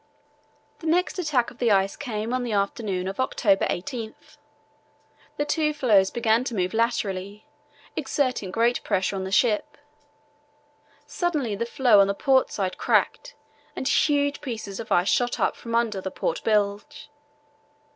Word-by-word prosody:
The 325 Hz, -, -6 dB
next 360 Hz, +3 st, +1 dB
attack 295 Hz, -8 st, 0 dB
of 245 Hz, -, -18 dB
the 240 Hz, -, +2 dB
ice 195 Hz, -1 st, +2 dB
came 225 Hz, -3 st, -4 dB
on 255 Hz, -, 0 dB
the 240 Hz, -3 st, -3 dB
afternoon 200 Hz, -2 st, -1 dB
of 195 Hz, +4 st, -5 dB
October 205 Hz, -6 st, +2 dB
18th. 220 Hz, +4 st, -6 dB, 1.0 s
The 290 Hz, -, 0 dB
two 300 Hz, 0 st, 0 dB
floes 205 Hz, -9 st, +4 dB
began 235 Hz, 0 st, +1 dB
to 240 Hz, -, -4 dB
move 185 Hz, -2 st, -1 dB
laterally, 210 Hz, -3 st, -2 dB, 0.5 s
exerting 260 Hz, -8 st, -1 dB
great 230 Hz, +5 st, +1 dB
pressure 190 Hz, +1 st, 0 dB
on 190 Hz, -1 st, -3 dB
the 190 Hz, -, -6 dB
ship. 210 Hz, 0 st, +1 dB, 1.3 s
Suddenly 300 Hz, -, -1 dB
the 235 Hz, +3 st, -3 dB
floe 240 Hz, -4 st, +4 dB
on 200 Hz, -, +5 dB
the 200 Hz, -, -1 dB
port 265 Hz, +2 st, +3 dB
side 190 Hz, -2 st, -3 dB
cracked -, -, 0 dB, 0.4 s
and 260 Hz, -, -3 dB
huge 285 Hz, -1 st, +2 dB
pieces 215 Hz, -6 st, -6 dB
of 225 Hz, -, -8 dB
ice 175 Hz, +2 st, +3 dB
shot 245 Hz, +2 st, +1 dB
up -, -, +1 dB
from 230 Hz, -1 st, -5 dB
under 225 Hz, -4 st, 0 dB
the 190 Hz, -, -4 dB
port 165 Hz, -, -3 dB
bilge. 210 Hz, +4 st, -1 dB
230 Hz, 155 wpm, -25 LUFS, 200-260 Hz, 1.3 s, on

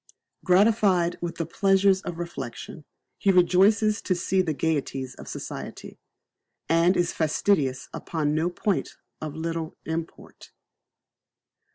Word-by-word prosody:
Gratified 185 Hz, -2 st, +3 dB
with 175 Hz, -1 st, -4 dB
the 165 Hz, -, -3 dB
pleasures 195 Hz, +3 st, +3 dB
of 175 Hz, -3 st, -6 dB
reflection, 165 Hz, -3 st, -7 dB, 0.3 s
he 195 Hz, -, +3 dB
rejoices 195 Hz, +4 st, +4 dB
to 185 Hz, -, 0 dB
see 185 Hz, +2 st, +1 dB
the 175 Hz, -4 st, -1 dB
gaieties 135 Hz, -3 st, -2 dB
of -, -, -12 dB
society, -, -, -7 dB, 0.7 s
and 170 Hz, +3 st, +3 dB
is 175 Hz, -1 st, +1 dB
fastidious 155 Hz, -4 st, +1 dB
upon 150 Hz, -3 st, -2 dB
no 160 Hz, +3 st, +1 dB
point 190 Hz, +2 st, -2 dB, 0.3 s
of 155 Hz, -1 st, -5 dB
little 165 Hz, 0 st, -4 dB
import. 160 Hz, 0 st, -7 dB
170 Hz, 120 wpm, -25 LUFS, 160-190 Hz, 0.7 s, rejoices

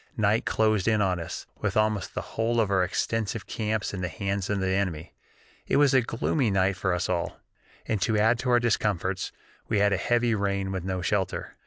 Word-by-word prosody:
Night 110 Hz, 0 st, +2 dB
closed 110 Hz, -3 st, +2 dB
in 110 Hz, -1 st, +3 dB
on 95 Hz, -3 st, +1 dB
us, 85 Hz, +1 st, -6 dB
with -, -, -1 dB
almost 110 Hz, -4 st, 0 dB
the -, -, -1 dB
whole 115 Hz, +1 st, +1 dB
of 105 Hz, -3 st, +1 dB
our 95 Hz, -2 st, +3 dB
extensive 110 Hz, +4 st, -2 dB
camps 110 Hz, -1 st, -2 dB
in 95 Hz, -, -4 dB
the 90 Hz, -, -1 dB
hands 95 Hz, +2 st, -3 dB
of 100 Hz, -1 st, 0 dB
the 95 Hz, 0 st, 0 dB
enemy. 95 Hz, -4 st, -2 dB, 0.5 s
It -, -, +2 dB
was 145 Hz, -2 st, +5 dB
a 130 Hz, -, +6 dB
gloomy 120 Hz, +2 st, 0 dB
night 95 Hz, 0 st, +2 dB
for 95 Hz, 0 st, -1 dB
us 90 Hz, -, -1 dB
all, 85 Hz, -2 st, -2 dB, 0.5 s
and 110 Hz, -4 st, -1 dB
to 110 Hz, +1 st, +2 dB
add 110 Hz, +3 st, +3 dB
to 125 Hz, -, -2 dB
our 120 Hz, -1 st, +5 dB
discomforts 100 Hz, -5 st, 0 dB, 0.4 s
we 110 Hz, -, +1 dB
had 100 Hz, 0 st, +3 dB
a -, -, +2 dB
heavy 120 Hz, +3 st, +1 dB
rain 100 Hz, -2 st, -1 dB
with 95 Hz, -2 st, -3 dB
no 95 Hz, -1 st, -3 dB
shelter. 95 Hz, -1 st, -1 dB
100 Hz, 210 wpm, -27 LUFS, 95-110 Hz, 0.5 s, a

